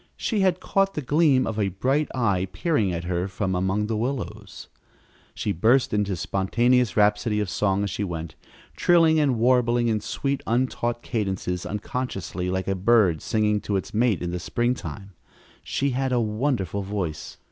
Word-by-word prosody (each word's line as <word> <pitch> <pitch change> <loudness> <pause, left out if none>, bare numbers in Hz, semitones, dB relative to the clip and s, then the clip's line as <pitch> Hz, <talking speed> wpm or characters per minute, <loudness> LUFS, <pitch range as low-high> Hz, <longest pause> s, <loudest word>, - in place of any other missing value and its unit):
She 220 - -1
had 185 -2 +2
caught 195 +1 0
the 150 - -3
gleam 145 -1 +3
of 110 -1 -3
a 100 - +2
bright 130 +11 0
eye 100 -7 +1
peering 115 - 0
at 85 -1 -3
her 90 +1 -1
from 95 0 -2
among 95 +3 0
the 110 +1 -2
willows! 110 -4 -4 0.7
She 105 - -2
burst 115 +8 +2
into 105 -1 0
a - - -1
spontaneous 115 +5 +1
rhapsody 105 +1 +2
of 105 -3 -2
song 100 -1 +1
as 100 - -2
she 105 - -3
went, 85 -4 -5 0.4
trilling 165 -2 +4
and 140 -5 +2
warbling 120 0 +3
in 110 -1 +1
sweet, 140 +5 -2
untaught 120 0 -1
cadences, 95 -5 -2
unconsciously 100 -4 -4
like 95 0 -2
a 95 - +1
bird 95 -4 +3
singing 105 -1 +1
to 105 - -2
its 95 - -3
mate 110 -4 +1
in 85 - -2
the 90 - -3
springtime. 120 -3 -3 0.5
She 140 0 -1
had 130 +1 -1
a 125 - +2
wonderful 105 - -1
voice. 95 -6 -4
105 Hz, 170 wpm, -24 LUFS, 95-125 Hz, 0.7 s, trilling